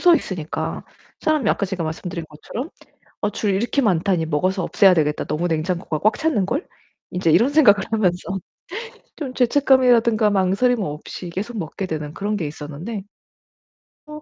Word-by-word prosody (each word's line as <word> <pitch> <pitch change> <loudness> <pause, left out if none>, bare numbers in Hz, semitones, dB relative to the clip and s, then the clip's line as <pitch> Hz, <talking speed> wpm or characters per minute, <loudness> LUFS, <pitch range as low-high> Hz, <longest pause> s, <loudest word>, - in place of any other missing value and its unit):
서 350 -1 +7
있으니까 175 - -3 0.4
사람이 310 -4 +1
아까 200 - 0
제가 185 -3 -3
말씀드린 170 +1 -4
것처럼 225 - -7 0.5
'어 205 - +1
줄 205 -2 -1
이렇게 240 +7 +1
많다니 180 -4 +2
먹어서 185 +4 0
없애야 190 +1 +5
되겠다. 150 -3 +1
너무 155 +4 -1
냉장고가 165 -1 -1
꽉 215 +1 +2
찼는걸.' 280 - 0 0.5
인제 175 -3 +2
이런 225 - +5
생각을 215 -10 +5
하면서 195 -2 0 0.8
좀 265 -5 -5
죄책감이라든가 245 -4 +4
망설임 205 +5 +2
없이 155 +3 -6
계속 210 +6 -4
먹게 185 +3 -4
되는 150 -2 -4
그런 205 +1 -2
게 165 -6 -2
있었는데 155 +8 -6 1.1
어 300 0 -9
195 Hz, 350 characters per minute, -22 LUFS, 170-235 Hz, 1.1 s, 서